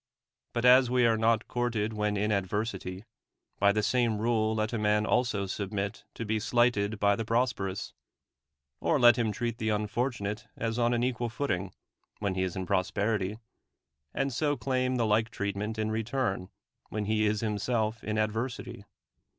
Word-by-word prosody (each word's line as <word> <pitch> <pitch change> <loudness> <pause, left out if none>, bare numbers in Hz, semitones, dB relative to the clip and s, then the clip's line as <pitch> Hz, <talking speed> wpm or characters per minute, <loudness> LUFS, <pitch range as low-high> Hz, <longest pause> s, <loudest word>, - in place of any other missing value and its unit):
But 120 +1 0
as 125 0 +7
we 125 -1 +3
are 115 -1 +4
not 110 0 +2
courted 115 -3 -1
when 105 -1 0
in 105 +2 +1
ad 100 -2 +1
versity, 95 -2 -3 0.6
by 100 0 +5
the 105 +1 0
same 120 -2 +2
rule 110 0 +1
let 110 +1 -1
a 115 - -1
man 105 0 +2
also 110 -5 +1
submit 100 +2 -4
to 115 - -4
be 110 +1 0
slighted 110 -2 +1
by 100 0 +4
the 115 - -3
prosperous; 115 -5 -1 0.9
or - - +2
let 120 -1 +8
him 115 -3 0
treat 120 +1 -3
the 110 - 0
unfortunate 105 +1 -2
as 115 +1 -2
on 120 0 +3
an 120 - 0
equal 120 -1 -1
footing 100 -7 -2 0.5
[when 100 -2 -1
he 95 - -1
is 95 -1 -1
in 95 -1 -3
prosperity], 100 +2 0 0.7
and 135 -1 -1
so 145 +3 0
claim 130 +1 0
the 120 -2 +1
like 110 +2 +2
treat 100 -4 -3
ment 105 +2 -3
in 110 0 -1
return 110 -4 -1 0.4
[when 105 0 -3
he 110 0 +2
is 105 0 0
himself 110 +1 -1
in 110 0 -2
ad 110 0 +2
versity] 120 -1 -5
110 Hz, 175 wpm, -29 LUFS, 105-120 Hz, 0.9 s, let